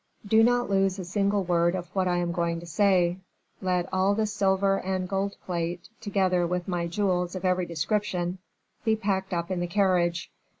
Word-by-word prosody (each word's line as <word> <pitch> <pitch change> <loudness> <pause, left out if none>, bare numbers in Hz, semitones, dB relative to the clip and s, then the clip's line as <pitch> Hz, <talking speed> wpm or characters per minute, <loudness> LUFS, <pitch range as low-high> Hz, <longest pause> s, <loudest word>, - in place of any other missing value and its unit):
"Do 220 +2 +5
not 245 +1 +3
lose 195 -1 +1
a 185 - -5
single 200 +2 +1
word 175 0 +2
of 180 -1 -4
what 190 -1 +1
I 175 -1 +1
am 175 -1 0
going 170 -1 -1
to - - -9
say: 180 0 +2 0.4
let 180 -1 0
all 190 +2 +2
the 220 0 +1
silver 195 -1 +1
and 185 -1 -2
gold 195 +1 -1
plate, 175 -1 -3
together 190 -4 +1
with 180 0 -2
my 175 -2 -1
jewels 180 -1 0
of 185 - -4
every 180 -1 +1
description, 180 +1 -1 0.4
be 220 -2 +3
packed 195 -3 -1
up 170 0 -2
in 185 - -1
the 175 - -1
carriage. 175 -3 +1
185 Hz, 185 wpm, -27 LUFS, 175-195 Hz, 0.4 s, Do